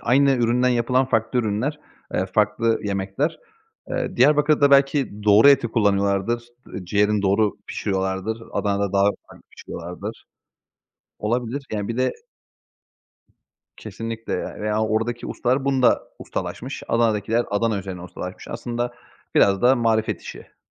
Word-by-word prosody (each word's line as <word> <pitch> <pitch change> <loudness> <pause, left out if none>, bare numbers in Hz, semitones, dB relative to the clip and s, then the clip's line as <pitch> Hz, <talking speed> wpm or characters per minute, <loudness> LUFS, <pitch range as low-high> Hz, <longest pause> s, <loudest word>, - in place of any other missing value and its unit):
aynı 140 +3 +4
üründen 125 0 +2
yapılan 125 +2 +2
farklı 115 0 0
ürünler, 120 +7 -1 0.3
eee, 95 - 0
farklı 110 +2 +2
yemekler. 100 +9 -2 0.5
Eee, - - -3
Diyarbakır'da 150 +2 +4
belki 140 -6 +3
doğru 105 +5 +7
eti 140 -4 +5
kullanıyorlardır, 100 +2 +1 0.2
ııı, 95 - -7
ciğerini 105 +2 +1
doğru 100 +1 +2
pişiriyorlardır, 95 +3 -2
Adana'da 100 -1 -1
daha 100 0 +3 0.2
farklı - - -16
pişiriyorlardır. 90 +6 -8 0.9
Olabilir, 120 +5 -2
yani, 105 0 -2
bir 115 - -3
de 130 +1 +1 1.6
Kesinlikle, 115 0 -6
eee, - - -5
veya 105 +1 0
oradaki 110 +2 -1
ustalar 130 +3 0
bunda 130 -3 +3 0.2
ustalaşmış, - - -5
Adana'dakiler 115 0 +1
Adana 105 0 +1
üzerine 95 -2 -7
ustalaşmış. 90 +1 -8
Aslında 120 +1 -4 0.4
biraz 100 -1 +4
da 130 +2 +5
marifet 110 -2 0
işi. - - -11
115 Hz, 120 wpm, -23 LUFS, 100-125 Hz, 1.6 s, doğru